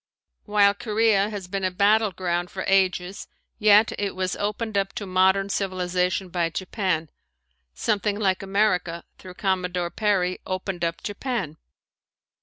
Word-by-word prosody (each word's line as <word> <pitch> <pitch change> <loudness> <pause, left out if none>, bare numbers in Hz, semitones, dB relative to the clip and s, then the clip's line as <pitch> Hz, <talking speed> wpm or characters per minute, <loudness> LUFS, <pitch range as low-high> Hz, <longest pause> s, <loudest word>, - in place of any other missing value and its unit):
While 205 -1 +4
Korea 210 -1 +2
has 200 -4 -6
been 195 +1 -3
a 185 - +2
battleground 185 -3 +1
for 190 - -5
ages 190 0 +1 0.3
yet 215 +1 +6
it 200 -2 -2
was 185 -1 -1
opened 210 +1 -3
up 195 -1 0
to 215 -4 -5
modern 190 +1 +3
civilization 185 -1 -1
by 170 -2 0
Japan 180 -3 -2 0.6
something 210 -1 0
like 190 -2 +1
America, 190 -4 0 0.2
through 185 -1 -11
Commodore 180 -3 -1
Perry, 195 -4 0
opened 185 -1 -4
up 165 0 -2
Japan. 205 - -3
195 Hz, 130 wpm, -24 LUFS, 180-205 Hz, 0.6 s, yet